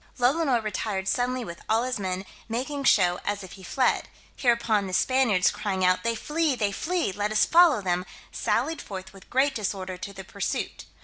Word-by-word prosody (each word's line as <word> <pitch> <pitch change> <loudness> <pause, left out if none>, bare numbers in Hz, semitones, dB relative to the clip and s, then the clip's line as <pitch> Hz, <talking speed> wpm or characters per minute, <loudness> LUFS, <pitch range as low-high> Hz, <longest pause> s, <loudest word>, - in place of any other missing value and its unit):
Lolonois 255 -1 +2
retired 200 -2 -2
suddenly 250 +3 0
with 170 -2 -8
all 225 +2 +3
his 255 -3 -2
men, 190 0 -3 0.2
making 270 +5 -3
show 180 -7 +4
as 205 -1 -2
if 190 - -10
he 195 - -11
fled; 255 +7 0 0.3
hereupon 230 -5 +2
the 185 - -6
Spaniards 230 -5 +3
crying 190 -3 -1
out 185 0 +3
"They 230 0 0
flee, 300 +4 0
they 210 -4 0
flee, 340 - -1
let 205 +2 -2
us 215 - +4
follow 330 - +5
them," 180 0 -1 0.2
sallied 320 -2 -1
forth 190 -1 -8
with 195 - -16
great 270 +2 +2
disorder 190 -5 -3
to 200 - -7
the 195 -1 -9
pursuit. 200 +1 -4
215 Hz, 185 wpm, -26 LUFS, 190-255 Hz, 0.3 s, follow